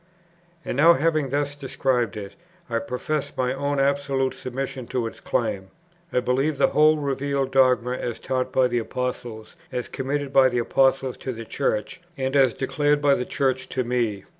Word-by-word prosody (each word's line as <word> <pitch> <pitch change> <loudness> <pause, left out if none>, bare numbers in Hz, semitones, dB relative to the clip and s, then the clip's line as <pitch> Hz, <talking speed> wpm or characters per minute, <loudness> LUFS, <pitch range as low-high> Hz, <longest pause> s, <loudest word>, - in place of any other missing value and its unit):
And - - -3
now, 165 +4 +7
having 155 -2 +1
thus 145 +1 -1
described 130 -5 -1
it, 100 -2 -7 0.4
I 115 - +1
profess 135 +5 -3
my 125 0 +1
own 140 +1 -1
absolute 135 -1 +1
submission 130 -1 -5
to 125 -3 -1
its 115 - -7
claim. 95 -1 -2 0.4
I 125 - +1
believe 135 +4 0
the - - +4
whole 155 +1 +4
revealed 140 -1 -1
dogma 130 -2 +3
as 120 -2 -3
taught 130 -1 -2
by 130 -1 +3
the 120 -1 0
Apostles, 120 -2 -5 0.2
as 125 - -3
committed 140 +1 -3
by 130 -1 +6
the 125 - -2
Apostles 135 +2 +2
to 130 - -4
the 115 0 -8
Church; 110 +10 -2 0.2
and 135 +1 -2
as 135 -4 +4
declared 145 +2 +1
by 145 -1 +4
the 125 - -1
Church 130 -1 -1
to 130 - -1
me. 115 -5 -1
130 Hz, 175 wpm, -24 LUFS, 125-140 Hz, 0.4 s, now